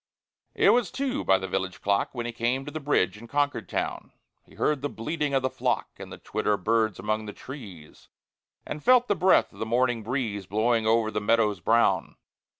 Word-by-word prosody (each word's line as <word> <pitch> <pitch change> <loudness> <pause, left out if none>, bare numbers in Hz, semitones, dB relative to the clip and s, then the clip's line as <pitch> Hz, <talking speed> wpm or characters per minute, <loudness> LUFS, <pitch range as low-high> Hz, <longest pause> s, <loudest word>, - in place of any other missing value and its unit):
It - - +5
was 240 -6 +2
two 270 -1 -2
by 95 - +4
the 95 0 -5
village 95 0 -3
clock, 100 0 +1
When 120 -2 -4
he 120 - -3
came 120 +3 -1
to 145 - -6
the 155 - -4
bridge 140 -9 +1
in 120 - -11
Concord 145 +2 -1
town. - - -3 0.3
He - - -20
heard 150 -3 0
the 145 - -2
bleating 150 +4 -2
of 135 - +1
the 130 - +1
flock, - - -1
And - - -9
the - - -8
twitter 105 0 -1
of 100 - -3
birds 110 -3 +1
among 110 0 -2
the 105 - -6
trees, 100 - -11 0.6
And 150 - -6
felt 250 -1 +5
the - - +3
breath 185 0 +3
of - - -15
the 110 - -2
morning 120 0 +1
breeze 110 -5 -3
Blowing 110 +2 +1
over 110 -1 +2
the 105 - -2
meadows 105 -1 +2
brown. 110 -6 +2
115 Hz, 210 wpm, -26 LUFS, 105-140 Hz, 0.6 s, It